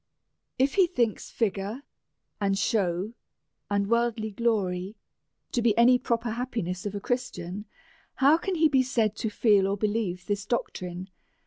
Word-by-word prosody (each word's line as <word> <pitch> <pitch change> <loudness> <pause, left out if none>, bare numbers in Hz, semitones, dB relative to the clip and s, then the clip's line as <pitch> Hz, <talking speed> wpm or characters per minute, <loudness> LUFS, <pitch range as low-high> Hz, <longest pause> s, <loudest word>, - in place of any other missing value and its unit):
If 270 +2 +2
he 380 -3 +5
thinks 235 - -1
figure 205 +3 -2 0.6
and 195 -1 +1
show, 195 -1 0 0.6
and 200 -1 +1
worldly 235 -1 +1
glory, 200 -3 -1 0.6
to 240 - 0
be 230 -2 +2
any 250 +2 +6
proper 235 -1 -1
happiness 220 -6 -3
of 205 - -5
a - - -2
Christian, 210 -5 -3 0.5
how 290 +4 +5
can 380 +1 -2
he 320 -1 +5
be 270 -3 +3
said 225 -5 +1
to 220 - -1
feel 205 -3 +3
or 200 +1 -1
believe 205 -4 -1
this 205 0 -1
doctrine. 185 -5 -3
220 Hz, 145 wpm, -27 LUFS, 195-240 Hz, 0.6 s, any